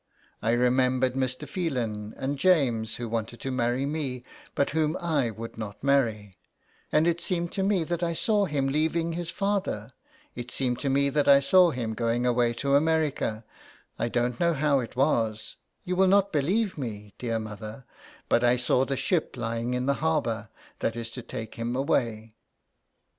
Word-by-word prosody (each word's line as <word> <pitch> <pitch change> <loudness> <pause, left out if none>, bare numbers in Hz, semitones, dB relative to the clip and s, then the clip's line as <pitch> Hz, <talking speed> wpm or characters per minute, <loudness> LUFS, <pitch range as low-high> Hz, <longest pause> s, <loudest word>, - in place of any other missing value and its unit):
I 115 +2 +1
re 125 +1 +3
membered 130 0 +2
Mr. 130 -1 -2
Phelan, 120 - -3
and 135 +1 -3
James, 130 -11 +2
who 120 - -5
wanted 115 0 -3
to 135 - -3
marry 125 +1 0
me, 140 -4 -3 0.3
but 140 - +1
whom 155 0 +1
1 150 - -1
would 115 0 -8
not 105 0 -7
marry; 115 -8 +1 0.6
and 155 +1 +4
it 170 0 +1
seemed 175 -3 -1
to 195 - -2
me 190 -3 +2
that 170 +1 -3
I 170 -1 0
saw 205 +2 +2
him 145 -6 -1
leaving 160 +4 0
his 170 0 -4
father 190 - -2 0.2
— - - -31
it 120 0 -6
seemed 125 -1 -1
to 140 - -1
me 140 +1 +3
that 145 +1 +1
I 140 0 +8
saw 180 +6 +5
him 120 -7 -3
going 115 +2 0
away 120 -1 +2
to 140 +3 -1
America 145 -7 +1 0.5
I 120 - 0
don't 120 0 -1
know 170 -1 +2
how 145 -1 +2
it 125 -1 -6
was 115 -5 0
— - - -48
you 180 - -1
will 190 +1 +4
not 200 0 +3
believe 185 +6 +1
me, 105 -5 -6
dear 115 -2 -1
mother 110 +3 -7 0.2
— - - -23
but 120 - +3
I 120 +1 +4
saw 125 +1 +2
the 135 0 -2
ship 160 -4 0
lying 115 +1 -2
in 125 0 -1
the 140 - +3
harbour, 120 -9 0 0.3
that 115 - -1
is 115 -1 -5
to 125 - -7
take 110 -1 -7
him 115 +2 -3
away. 115 -5 -1
130 Hz, 190 wpm, -27 LUFS, 115-155 Hz, 0.6 s, I